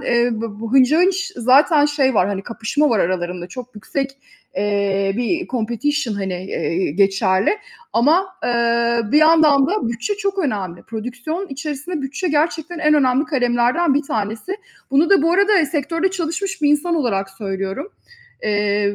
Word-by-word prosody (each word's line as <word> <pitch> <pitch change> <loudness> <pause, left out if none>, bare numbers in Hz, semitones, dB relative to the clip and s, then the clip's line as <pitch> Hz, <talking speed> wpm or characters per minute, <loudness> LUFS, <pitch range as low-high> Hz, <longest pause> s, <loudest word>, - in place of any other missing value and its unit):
eee, 240 0 +2
b 220 -1 -5
bu 230 0 -5
hınca 270 +4 +5
hınç 380 +2 +1
zaten 285 +5 +4
şey 275 -4 +1
var, 190 -1 +3
hani 195 -1 -3
kapışma 245 +6 -1
var 220 - +2
aralarında, 175 0 -2
çok 250 +2 -9
yüksek, 270 +6 -3 0.5
eee, 200 -1 0
bir 335 +9 -1
competition, 240 +1 -2
hani, 190 -2 -4
eee, 180 -3 -2
geçerli. 195 - +2 0.3
Ama, 310 +11 +3 0.2
ııı, 235 -1 +1
bir 300 - +6
yandan 310 -3 +5
da 390 - -1
bütçe 235 - -2
çok 395 -1 -3
önemli. 200 - -3
Prodüksiyon 250 - -5
içerisinde 300 +2 -5
bütçe 285 +7 -3
gerçekten 320 +2 -1
en 305 -1 +3
önemli 265 0 +3
kalemlerden 255 +2 +1
bir 290 - +1
tanesi. 220 - -4 0.3
Bunu 300 +7 +3
da 390 - +5
bu 330 +2 +2
arada 400 -4 +3
sektörde 330 +5 -1
çalışmış 360 0 -3
bir 290 - +4
insan 295 +4 +2
olarak 195 -10 -1
söylüyorum. 195 - -5 0.5
Eee, 205 -1 0
255 Hz, 150 wpm, -19 LUFS, 210-315 Hz, 0.5 s, bir